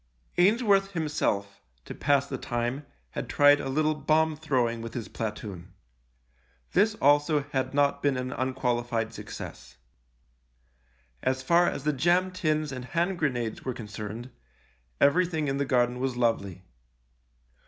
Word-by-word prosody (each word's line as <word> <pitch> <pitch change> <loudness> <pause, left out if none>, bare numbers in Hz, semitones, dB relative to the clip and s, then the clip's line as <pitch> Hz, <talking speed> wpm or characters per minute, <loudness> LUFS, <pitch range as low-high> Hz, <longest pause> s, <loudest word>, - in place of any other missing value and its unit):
Ainsworth 200 0 +4
himself, 100 - -1 0.2
to - - -7
pass 140 -1 +2
the 135 -2 -5
time, 120 +4 -3 0.2
had - - -5
tried 145 0 +6
a 135 - -4
little 155 +3 +2
bomb 155 +1 +2
throwing 125 -7 0
with 115 0 -7
his 120 -3 -4
platoon. 105 -5 -6 1.0
This 210 +3 +3
also 145 -1 +3
had 130 0 -1
not 140 0 +2
been 140 -2 +1
an 125 0 -3
unqualified 120 -3 -1
success. - - -9 1.4
As 130 0 -1
far 170 +5 +4
as 140 - -5
the 150 0 +1
jam 175 +6 +2
tins 155 -5 -1
and 130 -2 -6
hand 175 +6 -1
grenades 120 -7 -1
were 130 -2 -3
concerned, 110 +3 -7 0.7
everything 160 0 +3
in 135 0 -1
the 140 - 0
garden 125 -2 +1
was 130 -1 -2
lovely. 100 -6 0
135 Hz, 135 wpm, -27 LUFS, 120-155 Hz, 1.4 s, tried